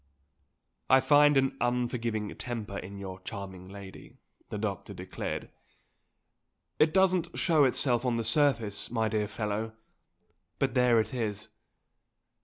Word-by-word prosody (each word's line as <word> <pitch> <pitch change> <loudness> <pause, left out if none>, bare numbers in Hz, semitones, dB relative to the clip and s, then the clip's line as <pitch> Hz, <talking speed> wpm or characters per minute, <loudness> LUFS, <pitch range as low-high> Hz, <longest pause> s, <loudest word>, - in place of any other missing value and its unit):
"I 130 - +7
find 145 +1 +5
an 135 0 +2
unforgiving 120 -3 -1
temper 110 -5 -5
in 100 +2 -8
your 95 -1 -7
charming 95 -1 -8
lady," 100 -1 -11 0.3
the - - -4
doctor 100 -2 -4
declared. - - -5 1.3
"It 155 0 +5
doesn't 185 -2 +2
show 160 -5 +4
itself 125 -1 +2
on 125 -2 +1
the 115 - -1
surface, 115 -4 +1
my 110 -2 0
dear 105 -1 0
fellow, 105 +1 -3 0.8
but - - 0
there 125 -2 +4
it 110 +2 -2
is. 110 -3 -3
115 Hz, 125 wpm, -29 LUFS, 105-130 Hz, 1.3 s, I